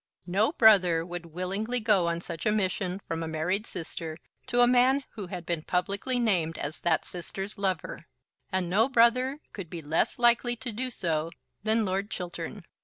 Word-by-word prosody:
No 195 Hz, +9 st, +2 dB
brother 185 Hz, -, +5 dB
would 175 Hz, -1 st, -6 dB
willingly 195 Hz, +8 st, -2 dB
go 210 Hz, -6 st, +3 dB
on 170 Hz, 0 st, -1 dB
such 165 Hz, +3 st, -4 dB
a -, -, +4 dB
mission 190 Hz, -2 st, -1 dB
from 165 Hz, 0 st, -3 dB
a 165 Hz, -, -3 dB
married 180 Hz, +7 st, -1 dB
sister 160 Hz, -1 st, -6 dB, 0.3 s
to 245 Hz, -1 st, +2 dB
a 245 Hz, -, +7 dB
man 255 Hz, +3 st, +4 dB
who 205 Hz, -5 st, -7 dB
had 180 Hz, -2 st, -6 dB
been 170 Hz, -2 st, -1 dB
publicly 200 Hz, +9 st, -1 dB
named 180 Hz, -9 st, +1 dB
as 145 Hz, +2 st, -4 dB
that 165 Hz, -2 st, +1 dB
sister's 195 Hz, +3 st, -6 dB
lover; 185 Hz, -4 st, -3 dB, 0.4 s
and 185 Hz, -2 st, 0 dB
no 215 Hz, +8 st, +3 dB
brother 255 Hz, +3 st, +3 dB
could 190 Hz, -5 st, -7 dB
be 165 Hz, -2 st, -7 dB
less 155 Hz, +3 st, +1 dB
likely 240 Hz, 0 st, +3 dB
to 235 Hz, +1 st, -5 dB
do 255 Hz, +4 st, -2 dB
so 165 Hz, -8 st, -1 dB, 0.3 s
than 220 Hz, +1 st, +2 dB
Lord 195 Hz, +2 st, -1 dB
Chiltern. 175 Hz, +1 st, -6 dB
190 Hz, 180 wpm, -28 LUFS, 170-225 Hz, 0.4 s, a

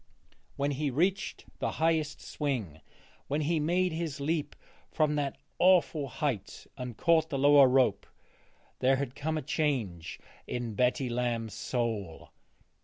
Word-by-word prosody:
When 140 Hz, +1 st, 0 dB
he 145 Hz, +1 st, -1 dB
reached 180 Hz, +9 st, 0 dB
the -, -, -1 dB
highest 160 Hz, -2 st, 0 dB
swing, 115 Hz, -, -3 dB, 0.5 s
when 145 Hz, +2 st, 0 dB
he 160 Hz, +2 st, +1 dB
made 175 Hz, +4 st, +1 dB
his 160 Hz, -3 st, -3 dB
leap 150 Hz, +2 st, -1 dB, 0.4 s
from 155 Hz, -1 st, +2 dB
that 140 Hz, -2 st, -1 dB, 0.2 s
awful 175 Hz, -5 st, +4 dB
height 120 Hz, -5 st, -3 dB
and 125 Hz, -4 st, -6 dB
caught 160 Hz, -1 st, +3 dB
the 140 Hz, -, -2 dB
lower 140 Hz, 0 st, +7 dB
rope, 125 Hz, -6 st, +2 dB, 0.7 s
there 130 Hz, +1 st, +4 dB
had 135 Hz, -2 st, -3 dB
come 155 Hz, +3 st, -2 dB
a 155 Hz, -, -3 dB
change 125 Hz, -, -2 dB, 0.3 s
in 120 Hz, -2 st, -3 dB
Betty 125 Hz, +4 st, +1 dB
Lamb's 120 Hz, -3 st, -2 dB
soul. 110 Hz, -6 st, -3 dB
140 Hz, 135 wpm, -30 LUFS, 120-155 Hz, 0.7 s, lower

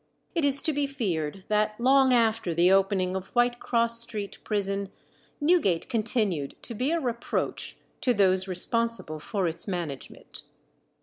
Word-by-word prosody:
It 335 Hz, -3 st, 0 dB
is 280 Hz, 0 st, +6 dB
to 315 Hz, -, +1 dB
be 285 Hz, 0 st, 0 dB
feared 190 Hz, -, -3 dB
that 215 Hz, +1 st, 0 dB
long 265 Hz, +1 st, +4 dB
after 225 Hz, -7 st, +1 dB
the 175 Hz, +2 st, +4 dB
opening 190 Hz, -1 st, +2 dB
of 190 Hz, 0 st, -4 dB
White 240 Hz, 0 st, +2 dB
Cross 230 Hz, -1 st, +2 dB
Street 215 Hz, -4 st, -2 dB
prison, 200 Hz, -2 st, -2 dB, 0.5 s
Newgate 290 Hz, -, +2 dB
continued 215 Hz, -, -1 dB
to 235 Hz, -, -4 dB
be 250 Hz, +5 st, -1 dB
a 335 Hz, +1 st, +1 dB
reproach 240 Hz, -5 st, -3 dB, 0.2 s
to 250 Hz, -, +2 dB
those 190 Hz, -3 st, +2 dB
responsible 195 Hz, -3 st, -2 dB
for 195 Hz, +3 st, -2 dB
its 165 Hz, +5 st, -4 dB
management. 170 Hz, -8 st, -6 dB
215 Hz, 145 wpm, -26 LUFS, 185-245 Hz, 0.5 s, is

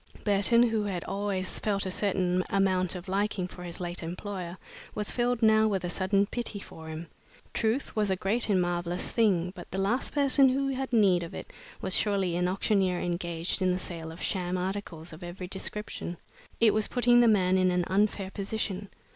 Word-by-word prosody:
Burton, 205 Hz, +3 st, +4 dB
who 225 Hz, -3 st, +1 dB
had 185 Hz, -4 st, -3 dB
always 195 Hz, -2 st, -2 dB
felt 200 Hz, -2 st, 0 dB
a 185 Hz, -, -2 dB
certain 185 Hz, -2 st, +1 dB
amount 185 Hz, -2 st, +2 dB
of 180 Hz, +1 st, -7 dB
liking 195 Hz, -1 st, 0 dB
for 180 Hz, -, -11 dB
his 175 Hz, -1 st, -6 dB
late 175 Hz, 0 st, -4 dB
employer, 180 Hz, +1 st, -5 dB, 0.4 s
was 210 Hz, -1 st, 0 dB
filled 245 Hz, -1 st, 0 dB
now 220 Hz, 0 st, +5 dB
with 195 Hz, -4 st, -1 dB
a 175 Hz, -, -2 dB
sudden 195 Hz, +2 st, +2 dB
pity 225 Hz, -1 st, -3 dB
for 160 Hz, -4 st, -11 dB
him. 160 Hz, +2 st, -6 dB, 0.5 s
Truth 230 Hz, +5 st, 0 dB
was 210 Hz, -2 st, +1 dB
a 190 Hz, -, +2 dB
great 215 Hz, +6 st, 0 dB
and 195 Hz, -3 st, +4 dB
marvelous 175 Hz, 0 st, -1 dB
thing, 185 Hz, -6 st, +2 dB
but 175 Hz, -, -10 dB
the 190 Hz, -, -3 dB
last 205 Hz, +7 st, 0 dB
person 275 Hz, -2 st, +4 dB
who 275 Hz, +1 st, 0 dB
had 265 Hz, 0 st, -3 dB
need 200 Hz, -7 st, +4 dB
of 170 Hz, -, -7 dB
it -, -, -8 dB, 0.3 s
was 185 Hz, -, +2 dB
surely 195 Hz, -4 st, +2 dB
an 180 Hz, +1 st, +1 dB
auctioneer 190 Hz, -1 st, +1 dB
engaged 170 Hz, +1 st, -2 dB
in 185 Hz, -, +3 dB
the 180 Hz, -, 0 dB
sale 165 Hz, -3 st, -6 dB
of 165 Hz, -, -9 dB
sham 180 Hz, -1 st, -1 dB
articles 180 Hz, -3 st, -4 dB
of 155 Hz, -, -11 dB
every 180 Hz, +1 st, -6 dB
description! 190 Hz, -2 st, -4 dB, 0.4 s
It 225 Hz, -2 st, +5 dB
was 215 Hz, -1 st, +1 dB
putting 245 Hz, -1 st, +4 dB
the 240 Hz, -, +6 dB
man 190 Hz, -3 st, +4 dB
in 185 Hz, 0 st, +4 dB
an 180 Hz, 0 st, +1 dB
unfair 195 Hz, 0 st, +1 dB
position. 200 Hz, -1 st, -3 dB
195 Hz, 195 wpm, -29 LUFS, 180-215 Hz, 0.5 s, the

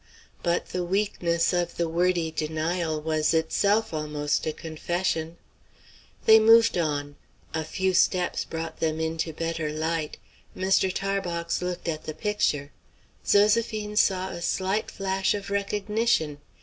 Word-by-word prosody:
But 170 Hz, -1 st, 0 dB
the 180 Hz, -, -2 dB
weakness 175 Hz, -3 st, 0 dB
of 175 Hz, -1 st, -1 dB
the 170 Hz, -, 0 dB
wordy 170 Hz, 0 st, +1 dB
denial 160 Hz, +1 st, -1 dB
was 155 Hz, 0 st, +1 dB
itself 200 Hz, +6 st, +1 dB
almost 150 Hz, -1 st, -1 dB
a -, -, +1 dB
confession. 165 Hz, +1 st, -3 dB, 0.9 s
They 220 Hz, 0 st, +8 dB
moved 225 Hz, +1 st, +6 dB
on. 145 Hz, -4 st, -2 dB, 0.4 s
A 160 Hz, -, -1 dB
few 190 Hz, +4 st, -1 dB
steps 180 Hz, 0 st, +2 dB
brought 165 Hz, 0 st, -6 dB
them 160 Hz, -1 st, 0 dB
into 160 Hz, 0 st, -2 dB
better 165 Hz, -1 st, -3 dB
light. 160 Hz, 0 st, -2 dB, 0.4 s
Mr. 190 Hz, 0 st, +2 dB
Tarbox 180 Hz, -4 st, -2 dB
looked 180 Hz, -1 st, -4 dB
at 155 Hz, -2 st, -3 dB
the 155 Hz, -, -5 dB
picture. 155 Hz, -7 st, -1 dB, 0.5 s
Zoséphine 210 Hz, 0 st, +2 dB
saw 190 Hz, -2 st, +2 dB
a 175 Hz, -, -7 dB
slight 190 Hz, +4 st, -1 dB
flash 190 Hz, 0 st, 0 dB
of 200 Hz, -1 st, -6 dB
recognition. 200 Hz, -5 st, 0 dB
170 Hz, 130 wpm, -26 LUFS, 160-195 Hz, 0.9 s, They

